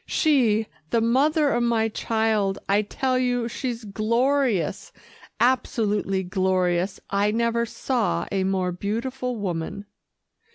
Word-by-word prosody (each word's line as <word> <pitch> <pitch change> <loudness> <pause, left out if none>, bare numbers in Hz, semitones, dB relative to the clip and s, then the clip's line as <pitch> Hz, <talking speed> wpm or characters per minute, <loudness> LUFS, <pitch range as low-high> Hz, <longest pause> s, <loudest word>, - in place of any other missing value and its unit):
She, 240 -9 +2 0.2
the 230 - +2
mother 285 +6 +3
of 240 - +1
my 230 -2 +2
child. 220 -3 0
I 200 +1 +3
tell 255 +4 -1
you, 245 -2 0
she's 240 -1 -4
glorious 225 - 0 0.5
absolutely 210 -6 +1
glorious. 185 -1 0
I 200 +1 +2
never 235 +1 0
saw 225 - -1
a 195 -1 0
more 190 -1 0
beautiful 240 +7 -3
woman." 195 -1 -4
220 Hz, 115 wpm, -24 LUFS, 195-245 Hz, 0.5 s, mother